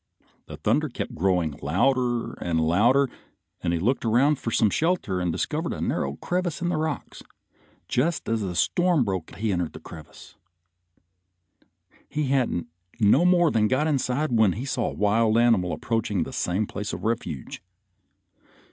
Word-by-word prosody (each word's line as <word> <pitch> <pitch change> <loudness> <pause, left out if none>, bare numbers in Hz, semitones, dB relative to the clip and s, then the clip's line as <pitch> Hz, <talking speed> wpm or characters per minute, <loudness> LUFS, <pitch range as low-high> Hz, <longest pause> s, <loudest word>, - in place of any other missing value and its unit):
The - - -9
thunder - - +1
kept - - -5
growing 90 -4 0
louder 120 - +1
and 80 -2 0
louder, 110 - +3 0.5
and 85 - -1
he 85 - +1
looked 115 +11 0
around 130 +6 +3
for 115 - -3
some 110 -2 +2
shelter 160 - 0
and 90 -1 0
discovered - - -2
a - - -6
narrow 70 +1 -1
crevice 180 - -2
in 175 -1 -1
the 175 - 0
rocks, 155 -2 -4
and - - -20 0.6
just 160 +7 0
as 115 -1 0
the 90 -3 -3
storm 175 - +2
broke 95 -6 -4
he 110 0 -1
entered 90 -3 -2
this 80 - -11
crevice. 80 -2 -12 1.8
He 150 -3 -2
hadn't 130 -10 +1 0.3
no 115 +10 +4
more 175 -2 +4
than 110 -1 +2
got 130 +6 +1
inside 145 -1 0
when 110 -5 +4
he 120 +6 -5
saw 130 -3 -1
a - - -8
wild 110 +2 +2
animal 115 -7 +3
approaching 105 -6 -1
the - - -8
same 95 +5 0
place 105 +1 -5
of - - -6
refuge. 110 - -3
115 Hz, 165 wpm, -25 LUFS, 90-135 Hz, 1.8 s, no